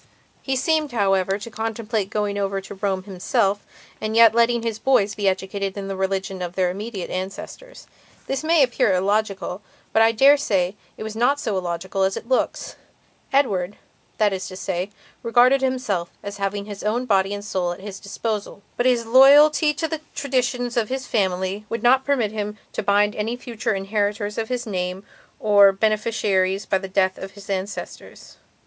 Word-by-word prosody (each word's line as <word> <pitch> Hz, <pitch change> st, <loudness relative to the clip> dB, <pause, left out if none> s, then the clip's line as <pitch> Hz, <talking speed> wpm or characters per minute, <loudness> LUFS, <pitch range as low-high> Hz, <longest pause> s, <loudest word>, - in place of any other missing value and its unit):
He 265 Hz, -, -1 dB
seemed, 305 Hz, 0 st, 0 dB
however, 195 Hz, -3 st, +1 dB
to 210 Hz, +3 st, -9 dB
contemplate 220 Hz, -2 st, -3 dB
going 210 Hz, -1 st, -1 dB
over 195 Hz, 0 st, -1 dB
to 195 Hz, -, -9 dB
Rome 195 Hz, -1 st, -2 dB
himself 200 Hz, +2 st, 0 dB, 0.4 s
and 215 Hz, 0 st, -2 dB
yet 230 Hz, -1 st, +7 dB
letting 235 Hz, 0 st, +2 dB
his 225 Hz, -2 st, -3 dB
boys 220 Hz, -5 st, +2 dB
be 205 Hz, -1 st, -1 dB
educated 190 Hz, +1 st, -2 dB
in 195 Hz, -1 st, -4 dB
the 195 Hz, -, -4 dB
religion 190 Hz, 0 st, -2 dB
of 175 Hz, 0 st, -5 dB
their 185 Hz, -2 st, +1 dB
immediate 200 Hz, 0 st, -6 dB
ancestors. 195 Hz, -, -7 dB, 0.4 s
This 270 Hz, +2 st, -3 dB
may 320 Hz, -2 st, +4 dB
appear 240 Hz, -6 st, +2 dB
illogical, 195 Hz, 0 st, -1 dB, 0.3 s
but 220 Hz, -, +4 dB
I 225 Hz, 0 st, +6 dB
dare 275 Hz, +6 st, +6 dB
say 195 Hz, -9 st, 0 dB, 0.2 s
it -, -, -6 dB
is 220 Hz, 0 st, -6 dB
not 250 Hz, +5 st, +2 dB
so 220 Hz, -7 st, -2 dB
illogical 185 Hz, +1 st, -3 dB
as 190 Hz, 0 st, +1 dB
it -, -, -8 dB
looks. 260 Hz, 0 st, -1 dB, 0.5 s
Edward, 205 Hz, -9 st, +1 dB, 0.4 s
that 210 Hz, -2 st, +2 dB
is 185 Hz, -1 st, -4 dB
to 185 Hz, -, -8 dB
say, 185 Hz, +1 st, -3 dB, 0.3 s
regarded 245 Hz, +3 st, +4 dB
himself 250 Hz, -10 st, -1 dB
as 200 Hz, 0 st, -6 dB
having 200 Hz, 0 st, -2 dB
his 205 Hz, -1 st, -8 dB
own 230 Hz, +4 st, -1 dB
body 195 Hz, -4 st, +2 dB
and 205 Hz, 0 st, -5 dB
soul 185 Hz, -4 st, -1 dB
at 175 Hz, -, -7 dB
his 195 Hz, 0 st, -8 dB
own -, -, -27 dB
disposal. 205 Hz, 0 st, -4 dB
But 245 Hz, -, +2 dB
his 240 Hz, -2 st, +2 dB
loyalty 290 Hz, +5 st, +6 dB
to 320 Hz, -, -1 dB
the 320 Hz, -1 st, -4 dB
traditions 250 Hz, -3 st, -1 dB
of 220 Hz, -3 st, +1 dB
his 260 Hz, 0 st, -3 dB
family 190 Hz, 0 st, -1 dB
would 230 Hz, -1 st, -4 dB
not 260 Hz, +2 st, +4 dB
permit 250 Hz, -7 st, +1 dB
him 210 Hz, -1 st, -4 dB, 0.2 s
to -, -, -2 dB
bind 205 Hz, +1 st, +2 dB
any 220 Hz, +3 st, -2 dB
future 230 Hz, -4 st, -3 dB
inheritors 205 Hz, +1 st, -2 dB
of 220 Hz, -, -3 dB
his 250 Hz, -1 st, -2 dB
name 185 Hz, -2 st, -3 dB, 0.4 s
or 205 Hz, -2 st, +6 dB
beneficiaries 200 Hz, -2 st, 0 dB
by 190 Hz, -, +1 dB
the 195 Hz, -, -6 dB
death 190 Hz, -1 st, +1 dB
of 190 Hz, 0 st, -8 dB
his 200 Hz, 0 st, -9 dB
ancestors. 195 Hz, +1 st, -6 dB
210 Hz, 180 wpm, -22 LUFS, 195-235 Hz, 0.5 s, yet